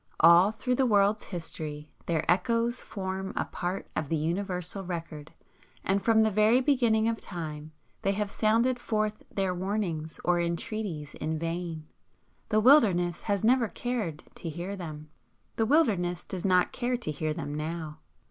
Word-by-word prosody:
All 170 +4 +7
through 235 +4 -2
the 260 +1 +2
world's 205 -1 +3
history 155 -4 -5 0.2
their 160 -2 0
echoes 230 +7 +1
form 190 -2 -4
a - - 0
part 180 +2 -4
of 150 - -2
the 165 - +1
universal 180 +3 -2
record, 165 -4 -6 0.5
and 195 +1 +1
from 225 -1 +5
the 220 - +2
very 215 +4 +4
beginning 240 -5 +3
of 230 0 -1
time 155 -3 -6 0.3
they 195 - +1
have 205 0 -2
sounded 230 +4 +2
forth 215 -2 -1
their 190 -2 0
warnings 180 -4 -3
or 175 0 +3
entreaties 170 -2 -3
in 160 +1 -3
vain. 165 -1 -4 0.6
The 215 - +3
Wilderness 200 - +5
has 200 -2 -1
never 240 +1 +4
cared 215 -11 -3
to 165 - -5
hear 175 +5 -5
them. 155 -5 -7 0.5
The 225 - +2
Wilderness 195 - +2
does 185 -1 -5
not 180 -2 +3
care 245 +1 -1
to 235 -10 -4
hear 155 +1 -2
them 150 -2 -4
now. 155 0 -4
190 Hz, 155 wpm, -28 LUFS, 165-220 Hz, 0.6 s, All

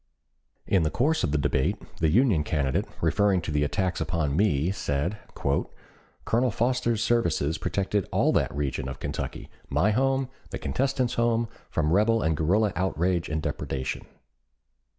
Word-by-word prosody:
In 95 - +3
the 80 - +1
course 150 - +1
of - - +1
the 75 - +2
debate, 65 -2 +1 0.2
the 80 - +3
Union 105 - +3
candidate, 70 -3 0 0.2
referring 95 +3 +3
to 85 - -4
the 75 0 +1
attacks 90 +5 -1
upon 80 -5 -1
me, 90 -4 +2
said: 90 +2 -2 0.2
"Colonel 115 - -2
Foster's 120 0 0
services 85 -9 +1
protected 100 0 -1
all - - +2
that - - +1
region 70 -2 -2
of 65 - -7
Kentucky, - - -4 0.2
my 105 +4 +2
home, 135 +3 +1 0.2
the - - -4
contestant's 130 -2 0
home, 115 0 +2 0.2
from 80 -1 0
rebel 110 +3 +3
and 80 0 +1
guerrilla 95 +7 +2
outrage 90 -1 0
and 80 0 -2
depredation. 65 -1 -3
95 Hz, 150 wpm, -26 LUFS, 75-115 Hz, 0.2 s, In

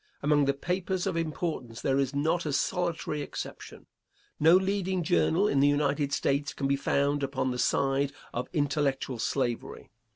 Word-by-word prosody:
Among 145 0 +3
the 140 0 +1
papers 180 +4 -2
of 190 -3 -1
importance 155 -7 -3
there 135 0 +1
is 135 0 -1
not 160 +3 0
a 145 - -1
solitary 165 -1 -1
exception. - - -7 0.5
No 160 +3 +6
leading 190 -1 0
journal 175 +2 +2
in 140 - +2
the 140 - +5
United 145 0 +1
States 140 +1 0
can 135 - -1
be 140 - +2
found 140 +1 +1
upon 135 -1 -1
the 125 - -4
side 135 +2 +1 0.2
of 125 +2 -3
intellectual 145 -5 0
slavery. 120 -1 -2
145 Hz, 160 wpm, -28 LUFS, 140-165 Hz, 0.5 s, No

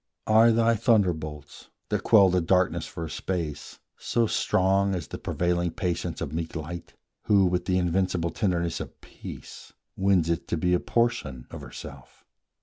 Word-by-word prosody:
Are 110 +2 +6
thy 115 0 +3
thunderbolts, 85 - 0 0.2
That - - 0
quell 100 -4 +6
the 90 0 +2
darkness 90 +2 +1
for 85 - -6
a - - -5
space, 85 -6 -4 0.2
so 115 - 0
strong 95 -1 +1
As 85 -5 -5
the - - -6
prevailing 85 0 0
patience 85 -2 -3
of 70 - -4
meek 80 +1 -4
Light, 85 +2 -7 0.3
Who, 100 -2 +4
with 90 0 0
the 90 -1 +1
invincible 90 -1 0
tenderness 85 -3 -1
of - - -8
peace, - - -11 0.2
Wins 95 -4 +2
it 85 0 -1
to 85 - -1
be 90 +3 +1
a 90 - +3
portion 115 - -1
of - - -8
herself? 70 -3 -11
90 Hz, 160 wpm, -26 LUFS, 80-95 Hz, 0.3 s, Are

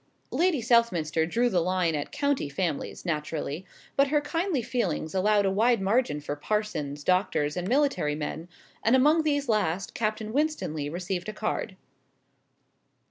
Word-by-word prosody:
Lady 340 -6 +2
Southminster 175 - +2
drew 235 +7 +2
the 190 -7 +2
line 180 -1 +1
at 145 -2 -3
county 280 - 0
families, 155 +2 -3
naturally, 155 +1 -3 0.3
but 275 0 +4
her 295 +1 +3
kindly 330 -2 -1
feelings 210 -10 -2
allowed 205 +2 +3
a 195 - +2
wide 230 +4 +3
margin 195 - +1
for 145 0 -4
parsons, 150 -5 -2
doctors, 180 -5 +1
and 180 0 -3
military 260 - +1
men 160 +3 -5 0.3
and 230 +3 +4
among 300 +5 +5
these 285 -3 0
last 195 -4 0
Captain 215 0 -2
Winstanley 265 - -1
received 180 +3 -3
a - - -5
card. 215 -2 -3
195 Hz, 145 wpm, -27 LUFS, 160-245 Hz, 0.3 s, among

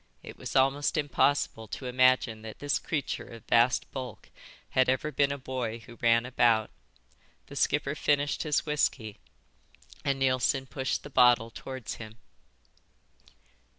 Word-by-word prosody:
It - - -9
was - - -7
almost 135 +3 +2
impossible 145 -6 +1
to 130 - -7
imagine 125 -3 +3
that 110 -1 -9
this 145 0 -1
creature 150 -4 -3
of 115 -1 -12
vast 120 +1 +3
bulk 130 -2 -7 0.4
had 130 -1 +3
ever 130 +4 0
been 140 -1 +2
a 140 - -3
boy 130 -4 -4
who 115 +1 -14
ran 115 0 +4
about. 120 -3 +2 0.7
The - - -12
skipper 140 - +1
finished 145 -1 0
his 150 -3 0
whisky, 130 -8 -1 0.8
and 140 -1 0
Neilson 130 0 +1
pushed 130 0 -3
the 145 - -10
bottle 120 -3 +4
towards 130 0 -7
him. 110 0 -10
130 Hz, 140 wpm, -29 LUFS, 115-140 Hz, 0.8 s, ran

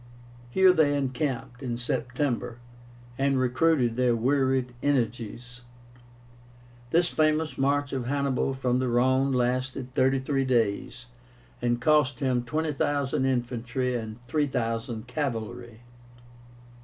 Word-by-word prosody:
Here 185 +7 +5
they 145 -4 +3
encamped, 130 -2 -3
in 120 -3 -3
September, 125 0 -2 0.6
and 135 0 +2
recruited 130 -1 +2
their 125 -2 +3
wearied 130 +1 +1
energies. 125 -2 -2 1.3
This 170 +4 +3
famous 155 0 +1
march 140 +1 0
of 130 -3 -2
Hannibal 135 -1 0
from 125 -1 0
the 130 - 0
Rhone 130 +3 +2
lasted 130 +1 -1
thirty 130 +1 +3
three 135 +1 0
days, 115 -6 0 0.6
and 120 0 +1
cost 150 +1 +3
him 130 -3 0
20,000 145 0 -1
infantry 125 0 -1
and 110 -1 -5
3,000 120 -4 -2
cavalry. 120 -3 -4
130 Hz, 105 wpm, -27 LUFS, 120-140 Hz, 1.3 s, Here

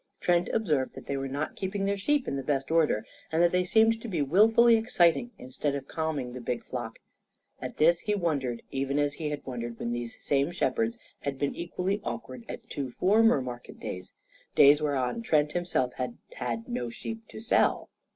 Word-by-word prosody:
Trent 175 0 +2
observed 150 -12 0
that - - -9
they 140 - -2
were 135 0 -2
not 140 +3 -3
keeping 195 +1 -2
their 200 0 +1
sheep 280 +8 +1
in - - -1
the 135 - -2
best 135 0 -1
order, 160 -10 +2 0.3
and 160 - +1
that 175 - +4
they 180 0 +2
seemed 225 +4 +3
to 240 - -6
be 180 -7 -2
wilfully 225 - +6
exciting 220 -1 +3
instead 135 +3 -3
of 140 - -5
calming 150 -6 -2
the 125 - -6
big 120 0 -3
flock. 120 -3 -5 0.6
At - - -6
this 170 +2 +5
he 210 +2 -1
wondered, 140 - -1
even 135 +1 -1
as 145 -1 +1
he 155 0 -3
had 150 -1 -5
wondered 120 -2 -5
when 120 - -3
these 120 -1 -4
same 140 +1 +1
shepherds 225 +6 0 0.2
had 140 -1 -3
been 140 +1 -1
equally 180 +4 -2
awkward 120 +1 -6
at - - -7
two 135 -2 -4
former 205 - +4
market 120 -1 -8
days 90 0 -7 0.4
days 145 +1 +7
whereon 145 - 0
Trent 150 -8 +2
himself 165 -8 0
had 125 -2 -3 0.2
had 115 -2 -4
no 120 -1 -3
sheep 225 - -7
to - - -9
sell. 225 +2 +2
150 Hz, 195 wpm, -28 LUFS, 130-190 Hz, 0.6 s, days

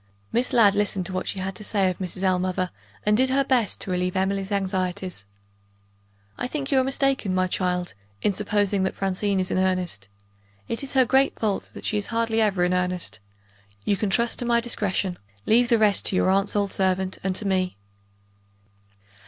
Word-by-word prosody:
Miss 245 +2 +1
Ladd 215 -5 +6
listened 205 -2 0
to 190 - -4
what 185 - -2
she - - -1
had 190 +1 -3
to 210 - -8
say 200 -2 +1
of 180 -2 -2
Mrs. 185 0 -4
Ellmother, 185 -1 0 0.3
and 210 0 +4
did 260 +3 +3
her 275 +1 +3
best 250 -6 +1
to 190 - -5
relieve 180 0 -1
Emily's 195 +1 -1
anxieties. 185 - -2 1.1
"I - - -1
think 280 +1 -4
you 270 - +4
are - - +3
mistaken, 270 -7 0
my 185 0 +2
child, 180 -2 -1 0.3
in 205 - +2
supposing 205 0 0
that 190 - -1
Francine 195 +1 0
is 185 - -1
in - - +1
earnest. 180 - -1 0.6
It 230 - -3
is 275 - -6
her 260 -2 +5
great 270 +3 +3
fault 210 -3 -1
that - - -8
she 210 - +1
is 205 - -5
hardly 230 -1 0
ever 200 -4 +2
in 180 0 +2
earnest. 180 - -2 0.7
You 200 - +2
can 200 +1 -1
trust 235 +4 +1
to 245 - -1
my 235 0 +3
discretion; 200 -5 -1 0.3
leave 240 +2 +4
the 235 - +5
rest 210 -2 +2
to - - +1
your 185 - +3
aunt's 195 +2 +1
old 200 -1 0
servant 190 0 0
and 190 -1 -1
to 210 - -3
me." 185 - 0
195 Hz, 195 wpm, -24 LUFS, 185-225 Hz, 1.1 s, Ladd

